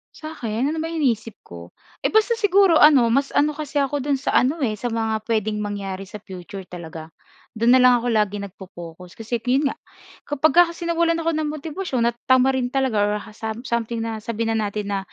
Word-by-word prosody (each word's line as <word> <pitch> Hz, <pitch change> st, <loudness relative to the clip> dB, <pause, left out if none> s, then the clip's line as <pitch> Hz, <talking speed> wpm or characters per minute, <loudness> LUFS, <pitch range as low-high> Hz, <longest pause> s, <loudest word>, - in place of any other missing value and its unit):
Sa'kin 270 Hz, -5 st, -3 dB
ano 320 Hz, -, -3 dB
ba 320 Hz, -, -2 dB
iniisip 240 Hz, -10 st, -1 dB
ko? 85 Hz, 0 st, -11 dB, 0.3 s
Eh, -, -, 0 dB
basta 440 Hz, +2 st, +3 dB
siguro 395 Hz, -5 st, +4 dB
ano 270 Hz, -6 st, +6 dB
mas 275 Hz, +3 st, +1 dB
ano 295 Hz, +1 st, +3 dB
kasi 300 Hz, -1 st, -8 dB
ako 280 Hz, +1 st, -1 dB
do'n 280 Hz, +1 st, 0 dB
sa 285 Hz, -, -2 dB
ano, 290 Hz, +6 st, +1 dB
eh, 215 Hz, -4 st, -1 dB
sa 245 Hz, -, -2 dB
mga 225 Hz, -1 st, -1 dB
puwedeng 215 Hz, -2 st, 0 dB
mangyari 195 Hz, -2 st, -5 dB
sa 210 Hz, +1 st, -9 dB
future 190 Hz, +1 st, -9 dB
talaga. 165 Hz, -3 st, -9 dB, 0.5 s
Do'n 230 Hz, +2 st, +4 dB
na 260 Hz, -, +6 dB
lang 250 Hz, -1 st, +6 dB
ako 240 Hz, +1 st, -3 dB
laging 205 Hz, -2 st, 0 dB
nagpo-pokus. 180 Hz, -2 st, -11 dB
Kasi 225 Hz, +1 st, -3 dB
'yon 260 Hz, +5 st, +1 dB
nga -, -, -3 dB, 0.5 s
kapag 295 Hz, +2 st, +2 dB
ka 350 Hz, -, +9 dB
kasi 340 Hz, 0 st, -8 dB
nawalan 335 Hz, 0 st, +2 dB
ako 330 Hz, 0 st, 0 dB
ng 310 Hz, -1 st, -1 dB
motibasyon 300 Hz, -3 st, -3 dB
at 235 Hz, -, -7 dB
tamarin 260 Hz, -1 st, +3 dB
talaga 265 Hz, -4 st, 0 dB
or 205 Hz, 0 st, +1 dB
ha 215 Hz, +1 st, -12 dB
sam 220 Hz, +3 st, -6 dB
something 235 Hz, -1 st, -2 dB
na 225 Hz, -1 st, -4 dB
sabihin 225 Hz, +1 st, -2 dB
na 215 Hz, -2 st, 0 dB
natin 205 Hz, 0 st, -4 dB
na 195 Hz, -, 0 dB
235 Hz, 205 wpm, -22 LUFS, 210-290 Hz, 0.5 s, ka